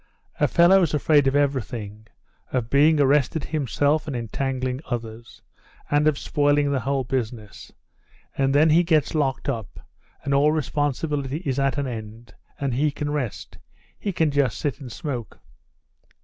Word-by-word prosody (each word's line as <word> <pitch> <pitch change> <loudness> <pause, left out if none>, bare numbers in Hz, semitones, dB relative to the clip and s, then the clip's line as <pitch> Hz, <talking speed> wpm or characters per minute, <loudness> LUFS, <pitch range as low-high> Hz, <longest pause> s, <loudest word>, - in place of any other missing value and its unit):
"A - - +3
fellow's 175 -2 +4
afraid 145 -1 +3
of 135 - +1
everything; 115 -7 -2 0.4
of 120 -3 -2
being 150 +2 +4
arrested 145 +2 +2
himself 150 +1 0
and 140 - -3
entangling 130 +2 -3
others, 115 -1 -6 0.5
and 145 +1 +3
of 150 -2 +2
spoiling 145 -1 +1
the 140 - +1
whole 135 +2 -1
business, 120 -5 -5 0.6
and 135 0 +1
then 155 +2 +5
he 165 +3 +6
gets 160 -4 +1
locked 135 -5 -1
up, 115 -8 -4 0.4
and 140 - -1
all 145 +2 +4
responsibility 145 0 -2
is 135 -1 -1
at 135 0 +1
an 140 - -1
end, 115 -1 -8 0.3
and 140 -3 -1
he 145 +5 +2
can 145 0 -4
rest; 135 -7 -4 0.4
he 200 - -2
can 160 -4 +1
just 135 -6 +1
sit 145 +2 -3
and 130 -4 -9
smoke." 125 -5 -6
140 Hz, 150 wpm, -24 LUFS, 125-150 Hz, 0.6 s, he